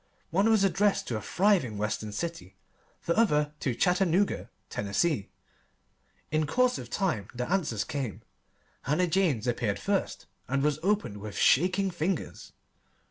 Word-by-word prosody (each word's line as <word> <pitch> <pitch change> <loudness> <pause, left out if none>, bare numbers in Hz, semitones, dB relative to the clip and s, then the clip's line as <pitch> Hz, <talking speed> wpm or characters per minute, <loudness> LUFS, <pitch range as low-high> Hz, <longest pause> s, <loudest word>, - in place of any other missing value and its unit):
One 195 +6 +3
was 220 -3 +4
addressed 195 +1 +2
to 115 - -1
a - - -5
thriving 175 - +2
Western 105 0 -2
city, 165 - -5 0.5
the 170 - +1
other 150 -10 +2
to 130 -4 -1
Chattanooga, 185 +4 +1 0.2
Tennessee. 105 +4 -1 1.0
In 155 -1 +1
course 250 +7 +2
of - - -8
time 165 - -1
the 125 0 -3
answers 160 - 0
came. 135 -8 -4 0.6
Hannah 150 +7 +1
Jane's 165 - +1
appeared 120 -4 0
first, 200 -1 -2 0.2
and 135 +1 0
was 150 0 +1
opened 195 - 0
with 105 0 -7
shaking 185 +6 +3
fingers. 170 +1 -3
160 Hz, 135 wpm, -28 LUFS, 120-195 Hz, 1.0 s, was